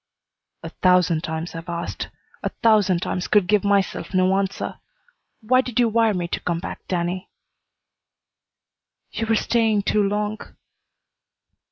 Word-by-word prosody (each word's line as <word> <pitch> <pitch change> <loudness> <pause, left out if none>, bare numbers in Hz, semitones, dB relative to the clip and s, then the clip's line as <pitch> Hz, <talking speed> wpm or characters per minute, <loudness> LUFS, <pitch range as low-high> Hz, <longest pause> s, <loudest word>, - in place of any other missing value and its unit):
"A - - -5
thousand 180 -3 +3
times 160 +1 -4
I've 165 +1 -8
asked. 170 0 -4 0.3
A - - -1
thousand 205 -6 +4
times 180 - -2
could 205 -3 +4
give 210 +2 +2
myself 200 -1 0
no 185 +1 +3
answer. 195 0 -2 0.6
Why 255 +4 +3
did 250 -2 -3
you 240 -2 +4
wire 225 -1 +2
me 175 -1 -2
to - - -2
come 170 -1 -2
back, - - -6
Danny?" 180 +1 -2 1.8
"You 225 - -3
were 225 - +3
staying 220 -2 +2
too 210 - +2
long." 210 +1 -1
195 Hz, 140 wpm, -23 LUFS, 180-215 Hz, 1.8 s, thousand